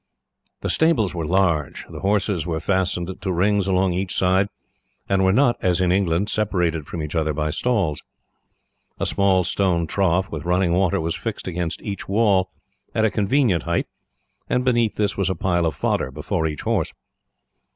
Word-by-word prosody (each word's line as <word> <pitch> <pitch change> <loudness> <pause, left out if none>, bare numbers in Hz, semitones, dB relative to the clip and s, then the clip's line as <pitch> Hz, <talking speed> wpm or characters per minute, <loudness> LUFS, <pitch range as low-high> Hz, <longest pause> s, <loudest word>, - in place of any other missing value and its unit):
The - - -2
stables 145 - +2
were 85 -3 -3
large. 85 -6 +1
The - - -9
horses 100 -4 0
were 80 -2 -1
fastened 95 0 -1
to 95 - -2
rings 100 +2 +1
along 95 -1 +2
each 90 +1 -2
side, 95 +2 +2 0.6
and 95 -1 +2
were 95 - +4
not, 120 +2 +3
as 90 -1 +2
in 90 -1 +2
England, 95 0 +1
separated 90 -8 0
from 80 - -5
each 75 - -5
other 80 -2 0
by 75 0 -1
stalls. 100 -8 0 1.0
A - - 0
small 95 -2 +2
stone 85 -1 +1
trough, 95 +2 0
with 75 -3 -5
running 90 +1 +1
water, 90 -1 +2
was 80 +1 -2
fixed 115 -4 -5
against 85 -2 -3
each 100 -2 -5
wall 100 -3 +3 0.5
at 110 - +3
a 110 - +2
convenient 105 - +2
height, - - -1 0.6
and 125 +1 +1
beneath 120 -3 +2
this 105 -1 0
was 95 -1 +1
a 95 - -1
pile 85 0 +1
of 80 - -2
fodder 65 - 0
before 80 - -2
each 75 -2 -5
horse. - - -1
95 Hz, 175 wpm, -22 LUFS, 85-100 Hz, 1.0 s, were